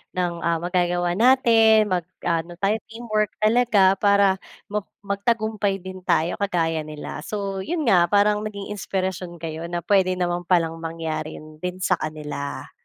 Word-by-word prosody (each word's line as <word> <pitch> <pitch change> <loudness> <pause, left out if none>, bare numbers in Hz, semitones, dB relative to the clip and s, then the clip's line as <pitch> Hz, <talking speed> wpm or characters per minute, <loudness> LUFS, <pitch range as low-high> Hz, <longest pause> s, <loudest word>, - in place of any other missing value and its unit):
ng, 180 -1 0
ah, 170 0 +1
magagawa 175 0 0
natin 225 -3 +5
mag-aano 175 -1 -2
tayo 200 +4 +1
teamwork 220 -2 -2
talaga 215 -4 +4
para 200 -2 +4 0.3
mag 210 -1 -2 0.2
magtagumpay 205 0 0
din 185 +1 -8
tayo 170 -1 +1
kagaya 165 -5 0
nila." 150 -1 -7
So, 200 -2 -3
'yon 320 - -2
nga 180 -7 +5
parang 210 +1 +3
naging 210 -1 -6
inspirasyon 185 -2 -3
kayo 165 0 -5
na 175 -1 -3
puwede 190 -2 +3
naman 175 -1 -1
palang 165 -2 +2
mangyari 160 -1 -4 0.2
din 180 0 -3
sa 180 - +2
kanila. 150 -2 -5
185 Hz, 140 wpm, -23 LUFS, 170-210 Hz, 0.3 s, natin